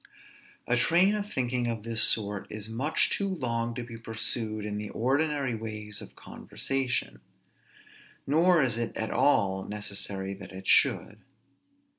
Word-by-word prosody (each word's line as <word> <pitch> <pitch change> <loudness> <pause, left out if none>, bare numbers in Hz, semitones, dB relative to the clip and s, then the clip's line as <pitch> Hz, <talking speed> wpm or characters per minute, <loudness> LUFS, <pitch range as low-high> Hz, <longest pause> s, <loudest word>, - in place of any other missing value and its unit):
A 120 - +2
train 175 - +4
of 210 0 -3
thinking 125 -1 -1
of 115 -3 -3
this 115 -1 +1
sort 105 -2 +2
is 105 0 -5
much 130 +8 +1
too 200 - 0
long 120 -9 -2
to 120 - -4
be 115 -1 -9
pursued 110 -1 -2
in 105 0 -3
the 105 -1 -5
ordinary 140 +2 0
ways 105 -2 -4
of - - -12
conversation; 130 - -3 1.0
nor 165 +3 +4
is 120 -3 +1
it 115 -1 -3
at 110 - -2
all 95 -9 +2
necessary 100 -2 -3
that 95 -1 -10
it 95 0 -9
should. - - +3
115 Hz, 145 wpm, -28 LUFS, 105-135 Hz, 1.0 s, train